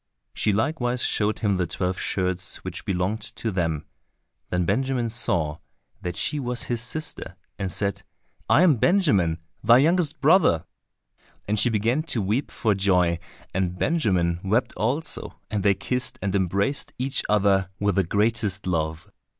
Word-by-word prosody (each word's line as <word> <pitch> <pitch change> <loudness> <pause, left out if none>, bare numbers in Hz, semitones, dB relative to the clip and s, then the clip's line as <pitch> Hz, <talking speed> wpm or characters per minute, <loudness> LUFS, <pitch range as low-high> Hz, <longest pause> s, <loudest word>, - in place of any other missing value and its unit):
She 105 - +1
likewise 125 +3 0
showed 105 0 0
him 100 -2 +2
the 90 -1 0
twelve 90 0 -2
shirts 90 -1 -2
which - - -6
belonged 95 +4 -1
to 115 - -2
them. 80 -5 -1 0.6
Then 90 -1 0
Benjamin 125 +4 0
saw 85 -10 -1 0.4
that 90 -1 -4
she 145 +9 0
was 125 -2 -2
his 120 -2 -1
sister, 120 -6 -4 0.2
and 95 -2 -1
said, 100 +1 0 0.5
"I 165 - +6
am 160 -8 +5
Benjamin, 105 - +3 0.3
thy 120 +3 +7
youngest 160 +2 +2
brother." 85 - +4 0.8
And 105 +1 0
she 115 - +3
began 115 +6 +1 0.2
to - - +2
weep 110 +8 0
for 110 -4 0
joy, 90 -3 +2 0.3
and 90 -1 -1
Benjamin 90 - +1
wept 110 +6 +1
also, 125 - -2
and 105 -2 0
they 100 +1 +3
kissed 125 +6 -2
and 95 0 -2
embraced 100 +8 0
each 130 +2 0
other 100 -2 +3
with 100 0 +1
the 95 - +2
greatest 105 +1 0
love. 80 -2 -2
100 Hz, 150 wpm, -25 LUFS, 90-120 Hz, 0.8 s, thy